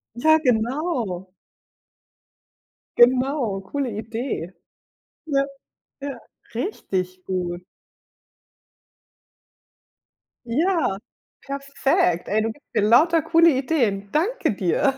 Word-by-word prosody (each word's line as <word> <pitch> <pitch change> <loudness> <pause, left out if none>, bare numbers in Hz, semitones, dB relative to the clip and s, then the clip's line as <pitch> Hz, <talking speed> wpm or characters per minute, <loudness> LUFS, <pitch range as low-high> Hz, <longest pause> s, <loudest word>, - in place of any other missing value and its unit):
Ja, 315 +6 +5
genau. 235 - -1 1.7
Genau, 250 -4 +3
coole 265 +6 -3
Idee. 220 -4 -4 0.7
Ja, 275 -2 +2 0.6
ja. 275 -3 -5 0.4
Richtig 185 - -3
gut. 180 -2 -3 2.8
Ja, 315 - +1 0.4
perfekt. 275 -10 0
Ey, 215 +2 +1
du 225 0 -1
gibst 290 - -18
mir - - +2
lauter 310 +10 +5
coole 330 +2 +5
Ideen. 245 -8 0
Danke 355 - +1
dir. 200 - +1
250 Hz, 80 wpm, -23 LUFS, 200-295 Hz, 2.8 s, Ja